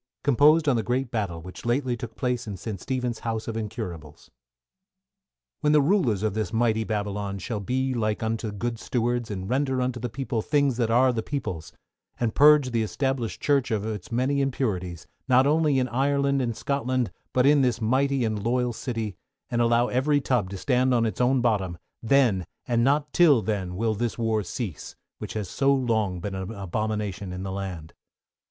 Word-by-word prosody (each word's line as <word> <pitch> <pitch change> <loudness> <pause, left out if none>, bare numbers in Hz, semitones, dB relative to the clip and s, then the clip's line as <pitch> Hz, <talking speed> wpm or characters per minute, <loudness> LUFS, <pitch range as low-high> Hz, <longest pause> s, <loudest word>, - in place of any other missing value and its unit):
Composed 150 +4 +5
on 135 - +4
the - - +1
Great 125 +2 -1
Battle 95 -8 -3
which 90 +1 -10
lately 125 +1 0
took 115 -1 -8
place 125 -2 -2
in 100 -2 -5
St. 100 0 -6
Stephen's 125 -3 -2
House 115 -1 -3
of 115 - -3
Incurables. 100 - -6 1.3
When 150 0 +2
the 150 - +6
rulers 140 - +2
of 110 -2 0
this 110 +1 -2
mighty 110 -1 +1
Babylon 105 -2 -3
shall 105 +3 -4
be 130 +6 -1
like 110 -2 -1
unto 110 -1 -2
good 115 +3 -3
stewards, 120 -1 -1
and 95 -2 -4
render 130 +2 0
unto 125 -1 -1
the 120 +1 -3
people, 125 -1 -2
things 140 -1 +1
that 115 -2 +1
are 125 +2 +4
the 115 - -1
people's, 100 - -4 0.5
and 115 -2 0
purge 145 -2 +6
the 115 -1 +1
Established 130 +1 -2
Church 140 -4 +2
of 110 -3 -1
its 110 -3 -5
many 130 +4 +1
impurities, 95 - -2 0.2
not 130 0 +5
only 150 -1 +3
in 130 -1 +1
Ireland 140 +2 +1
and 115 -3 -2
Scotland, 130 -5 -1 0.2
but 125 0 +2
in 145 0 +5
this 125 -3 +1
mighty 130 +3 +1
and 110 -2 -2
loyal 125 +1 +1
city, 115 -4 -4 0.3
and 120 -1 +1
allow 120 +1 +3
every 140 +4 +2
tub 125 -8 0
to 100 - -6
stand 130 +3 +2
on 115 -1 +2
its 110 - -2
own 125 +1 +3
bottom, 100 -7 0 0.2
then, 115 - +3 0.2
and 115 -1 +2
not 145 +3 +1
till 145 -10 +5
then 95 -3 -2
will 110 +3 0
this 115 +2 -2
war 115 -2 +1
cease, 95 - -6 0.2
which - - -6
has 105 -3 -3
so 135 +9 +2
long 110 -8 +1
been 100 +3 -5
an 95 0 -4
abomination 105 -1 -3
in 90 +1 -5
the 95 - -4
land. 95 -5 -6
120 Hz, 185 wpm, -26 LUFS, 105-130 Hz, 1.3 s, the